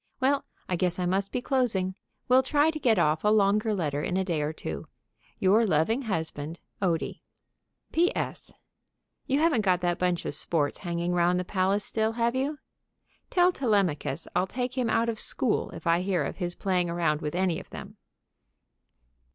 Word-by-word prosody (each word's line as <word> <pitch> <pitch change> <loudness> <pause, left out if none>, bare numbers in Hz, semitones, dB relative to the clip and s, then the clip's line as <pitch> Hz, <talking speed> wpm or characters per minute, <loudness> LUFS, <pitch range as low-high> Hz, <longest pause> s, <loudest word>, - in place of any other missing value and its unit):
Well, 275 +2 +2 0.2
I 180 - -1
guess 180 0 +1
I 180 - -1
must 190 +2 0
be 250 - -2
closing. 220 -9 +1 0.3
Will 255 +1 +6
try 290 +4 +2
to 310 - -6
get 235 -6 +3
off 155 -2 +2
a - - +2
longer 210 +1 +3
letter 150 -8 -1
in 180 - -1
a 190 - 0
day 165 -5 -1
or 150 +1 -1
two. 80 - -6 0.5
Your 200 +4 +4
loving 205 - +2
husband, 160 -2 -3 0.2
ODIE. 170 -4 -1 0.7
P.S. 345 +3 0 0.8
You 270 - +2
haven't 310 -8 +3
got 185 -3 +2
that 175 -1 0
bunch 180 -1 0
of - - -1
sports 150 -1 0
hanging 175 -1 -2
round 175 +1 +2
the 180 - -3
palace 195 +2 +1
still, 220 0 0
have 235 0 +1
you? 280 +3 -1 0.7
Tell 360 0 +4
Telemachus 195 - 0
I'll 185 - +2
take 250 +4 -3
him 250 -3 0
out 225 +1 +2
of 225 -2 -1
school 245 -5 0
if 165 - -10
I 170 +1 +3
hear 185 -1 0
of - - -4
his 175 -2 -3
playing 180 -3 0
around 165 -3 0
with 150 +2 -3
any 180 -2 +1
of - - -13
them. - - -9
190 Hz, 180 wpm, -27 LUFS, 170-230 Hz, 0.8 s, Will